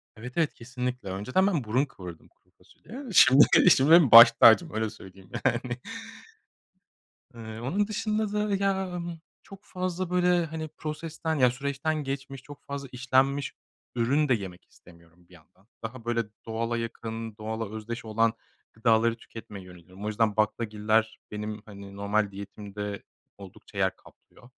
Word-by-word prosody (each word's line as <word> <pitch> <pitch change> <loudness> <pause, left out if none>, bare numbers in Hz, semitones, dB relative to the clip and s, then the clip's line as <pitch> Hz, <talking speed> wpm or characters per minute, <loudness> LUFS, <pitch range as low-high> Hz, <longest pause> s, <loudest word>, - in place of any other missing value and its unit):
Evet, 125 +3 -9
evet. 165 -3 +1
Kesinlikle. 125 -3 -5
Önceden 130 - 0
ben 170 -9 0
burun 120 +6 +1
kıvırırdım 90 - -11
kuru - - -36
fasulyeye. 265 +5 -12
Şimdi 140 -3 +6
benim 165 -6 +7
baş 115 +1 +12
tacım 115 +8 +5
öyle 110 0 -1
söyleyeyim, 95 -3 -14 0.2
yani. 120 -1 0 1.6
Eee, 110 -1 -8
onun 190 - -1
dışında 215 0 -2
da, 210 -1 0
ya, 195 -1 0
ımm, 170 -1 -6 0.2
çok 195 -1 -13
fazla, 185 -1 -4
böyle, 180 -1 +2
hani, 160 0 -6
prosesten, 160 +1 -5
ya, 125 -4 +4
süreçten 140 +4 -2
geçmiş, 135 -1 -6
çok 145 -1 -13
fazla 140 -1 -6
işlenmiş 130 +2 +1 0.4
ürün 135 +5 +1
de - - +5
yemek 95 -5 -5
istemiyorum, 85 0 -21
bir - - -20
yandan. 90 +4 -22 0.2
Daha, 115 +1 -7
böyle, 115 -1 0 0.2
doğala 115 +1 -2
yakın, 115 -1 -6
doğala 110 0 -4
özdeş 115 +2 -6
olan 110 +1 +1 0.4
gıdaları 115 0 +2
tüketmeye 105 -5 -11
yöneliyorum. 90 +2 -12
O - - -2
yüzden 110 0 0
baklagiller 110 0 0
benim, 105 0 -5
hani, 100 -1 -11
normal 100 0 0
diyetimde 100 0 -7 0.3
oldukça 100 +1 -13
yer 95 -1 +1
kaplıyor. 120 - -20
115 Hz, 145 wpm, -27 LUFS, 105-145 Hz, 1.6 s, baş